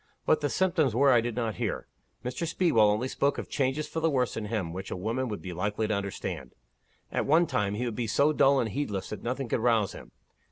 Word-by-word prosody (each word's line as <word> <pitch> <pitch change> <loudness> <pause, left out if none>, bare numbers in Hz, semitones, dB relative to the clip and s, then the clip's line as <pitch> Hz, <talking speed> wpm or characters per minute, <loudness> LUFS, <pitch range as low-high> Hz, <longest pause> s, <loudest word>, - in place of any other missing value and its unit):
What 155 - +3
the 145 - 0
symptoms 165 - +1
were 140 +2 +5
I 120 -2 +5
did 120 -1 -3
not 115 -3 -2
hear. - - -2 0.4
Mr. 125 +7 -2
Speedwell 135 - +3
only 110 +5 +1
spoke 140 +2 0
of - - -5
changes 140 +2 0
for 160 - -3
the 165 0 +2
worse 130 -4 0
in 110 - -3
him 105 -6 -2
which 95 +2 -6
a - - -3
woman 115 +7 -1
would 105 -3 -5
be 90 - -5
likely 105 +4 -1
to 110 - 0
understand. 100 -10 -4 0.6
At - - -1
one 160 +4 +5
time, 105 -8 -1
he 125 +4 -2
would 120 - -2
be 120 -1 -2
so 140 +8 +3
dull 140 -1 +4
and 115 - 0
heedless 105 -6 -3
that 105 - -5
nothing 130 +2 -3
could 115 - 0
rouse 115 -3 +2
him. - - -11
120 Hz, 240 wpm, -28 LUFS, 105-140 Hz, 0.6 s, were